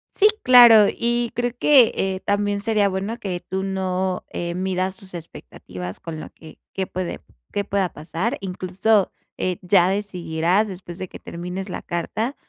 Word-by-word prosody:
Sí, 420 Hz, -, +6 dB, 0.2 s
claro, 235 Hz, -4 st, +9 dB
y 240 Hz, 0 st, 0 dB
creo 245 Hz, +1 st, 0 dB
que, 265 Hz, -6 st, +6 dB
eh, 190 Hz, -1 st, -1 dB
también 205 Hz, 0 st, 0 dB
sería 205 Hz, -1 st, +2 dB
bueno 195 Hz, +5 st, -3 dB
que 185 Hz, -5 st, -3 dB
tú 190 Hz, +2 st, -4 dB
no, 190 Hz, -1 st, -2 dB
eh, 170 Hz, 0 st, -4 dB
midas 185 Hz, 0 st, -1 dB
tus 190 Hz, -1 st, -8 dB
expectativas 90 Hz, -, -8 dB
con 160 Hz, -2 st, -7 dB
la -, -, -8 dB
que 160 Hz, -1 st, -15 dB, 0.2 s
qué 190 Hz, -1 st, -2 dB
puede 185 Hz, -1 st, -4 dB, 0.3 s
qué 205 Hz, -, -1 dB
pueda 195 Hz, -2 st, 0 dB
pasar. 165 Hz, +10 st, -3 dB
Incluso, 190 Hz, +2 st, +1 dB, 0.3 s
eh, 180 Hz, -2 st, -1 dB
ya 180 Hz, -1 st, +4 dB
decidirás 185 Hz, -1 st, 0 dB
después 180 Hz, -3 st, -8 dB
de 185 Hz, -, -5 dB
que -, -, -11 dB
termines 180 Hz, +3 st, -6 dB
la -, -, -5 dB
carta 215 Hz, -, -3 dB
190 Hz, 165 wpm, -22 LUFS, 180-205 Hz, 0.3 s, claro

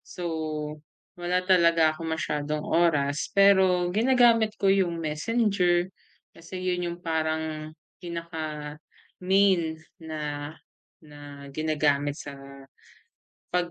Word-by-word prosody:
so 180 Hz, -, -9 dB, 1.0 s
wala 180 Hz, +1 st, 0 dB
talaga 170 Hz, -4 st, +4 dB
akong 160 Hz, +1 st, -6 dB
masyadong 150 Hz, -1 st, -2 dB
oras 150 Hz, -4 st, +1 dB
pero 190 Hz, -3 st, +5 dB
ginagamit 230 Hz, -1 st, +4 dB
ko 195 Hz, -, +1 dB
yung 185 Hz, -4 st, +1 dB
messenger, 180 Hz, +2 st, +1 dB, 0.5 s
kasi 165 Hz, +3 st, -9 dB
'yon 180 Hz, -1 st, -1 dB
yung 175 Hz, -, -9 dB
parang 160 Hz, -1 st, -2 dB, 0.3 s
pinaka-main 170 Hz, +2 st, -2 dB, 0.2 s
na 150 Hz, -2 st, -5 dB, 0.5 s
na 145 Hz, -1 st, -14 dB, 0.3 s
ginagamit 145 Hz, -2 st, 0 dB
sa 145 Hz, -3 st, -8 dB, 1.2 s
pag 175 Hz, -1 st, 0 dB
170 Hz, 90 wpm, -26 LUFS, 155-185 Hz, 1.2 s, pero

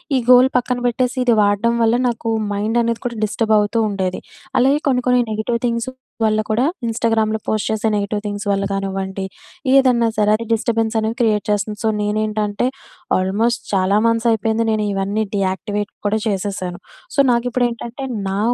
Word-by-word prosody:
ఈ -, -, +3 dB
గోల్ 255 Hz, +1 st, +7 dB
పక్కన 250 Hz, 0 st, -1 dB
పెట్టేసి, 250 Hz, +2 st, -1 dB
ఇది 240 Hz, -2 st, +4 dB
వాడడం 205 Hz, +3 st, +2 dB
వల్ల 225 Hz, +1 st, +3 dB
నాకు 230 Hz, -1 st, -3 dB, 0.2 s
మైండనేది 230 Hz, +3 st, 0 dB
కూడా 235 Hz, -2 st, -3 dB
డిస్టర్బ్ 220 Hz, +1 st, 0 dB
అవుతూ 210 Hz, +2 st, 0 dB
ఉండేది. 190 Hz, -2 st, -2 dB, 0.4 s
అలాగే 270 Hz, +4 st, +3 dB
కొన్ని, 250 Hz, -2 st, +2 dB
కొన్ని 250 Hz, 0 st, +4 dB
నెగెటివ్ 220 Hz, +2 st, -1 dB
థింగ్స్ 235 Hz, +1 st, -1 dB, 0.4 s
వల్ల 215 Hz, 0 st, +2 dB
కూడా, 230 Hz, +4 st, +2 dB, 0.2 s
ఇన్‌స్టాగ్రామ్‍లో 225 Hz, -1 st, 0 dB
పోస్ట్ 215 Hz, -1 st, 0 dB
చేసే 220 Hz, 0 st, 0 dB
నెగెటివ్ 205 Hz, 0 st, -1 dB
థింగ్స్ 205 Hz, 0 st, -4 dB
వల్ల 200 Hz, 0 st, 0 dB
గానివ్వండి, 195 Hz, 0 st, -3 dB, 0.5 s
ఏదన్న 255 Hz, -3 st, +4 dB
సరే 210 Hz, 0 st, +3 dB
అది 230 Hz, +2 st, -4 dB
డిస్టర్బెన్స్ 225 Hz, 0 st, 0 dB
అనేది 220 Hz, +1 st, -2 dB
క్రియేట్ 215 Hz, -3 st, +2 dB
చేస్తుంది. 210 Hz, +1 st, -1 dB
సో, 220 Hz, -, +2 dB
నేనేంటంటే 210 Hz, +1 st, -1 dB, 0.5 s
ఆల్మోస్ట్ 205 Hz, +6 st, 0 dB
చాలా 190 Hz, +1 st, +3 dB
మంత్స్ 230 Hz, +1 st, +1 dB
అయిపోయింది 225 Hz, +1 st, +1 dB
నేను 215 Hz, -1 st, 0 dB
ఇవన్నీ 200 Hz, +3 st, -1 dB
డీయాక్టివేట్ 200 Hz, +2 st, -2 dB, 0.2 s
కూడా 215 Hz, +2 st, +1 dB
చేసేశాను. 195 Hz, -3 st, -3 dB, 0.4 s
సో, -, -, 0 dB
నాకిప్పుడు 245 Hz, +1 st, +1 dB
ఏంటంటే, 235 Hz, +3 st, -6 dB, 0.2 s
నా 195 Hz, +1 st, -1 dB
220 Hz, 160 wpm, -19 LUFS, 205-235 Hz, 0.5 s, గోల్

